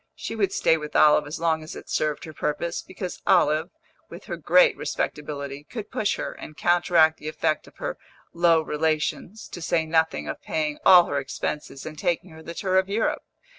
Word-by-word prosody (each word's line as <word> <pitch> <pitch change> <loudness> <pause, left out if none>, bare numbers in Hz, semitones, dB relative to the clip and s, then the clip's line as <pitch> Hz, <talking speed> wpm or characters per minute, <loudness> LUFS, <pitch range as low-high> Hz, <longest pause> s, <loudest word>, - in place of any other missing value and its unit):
She - - -6
would 200 -4 +1
stay 165 - +3
with 150 -1 -8
Olive 150 -1 +5
as 155 +2 -6
long 165 -1 +1
as 155 - -9
it - - -10
served 150 -1 -1
her 155 - -8
purpose, 155 +3 -2
because 185 -3 -7
Olive, 155 +3 +3 0.4
with - - -10
her - - -4
great - - +4
respectability, 140 -1 -4
could 215 +5 -8
push 210 - 0
her, - - -4
and 155 - -11
counteract 170 -2 +3
the 150 - -8
effect 155 0 -1
of - - -18
her - - -4 0.3
low 170 -1 +4
relations, 155 +7 -2
to 175 - -8
say 165 -1 +1
nothing 160 - +1
of 75 - -5
paying 150 -2 -2
all 180 -2 +8
her 145 - -1
expenses 140 +1 -5
and 155 -1 -8
taking 175 +1 -1
her 160 0 -12
the 170 +1 -8
tour 185 -1 +2
of 190 +1 -2
Europe. 215 +3 0
160 Hz, 195 wpm, -25 LUFS, 150-175 Hz, 0.4 s, all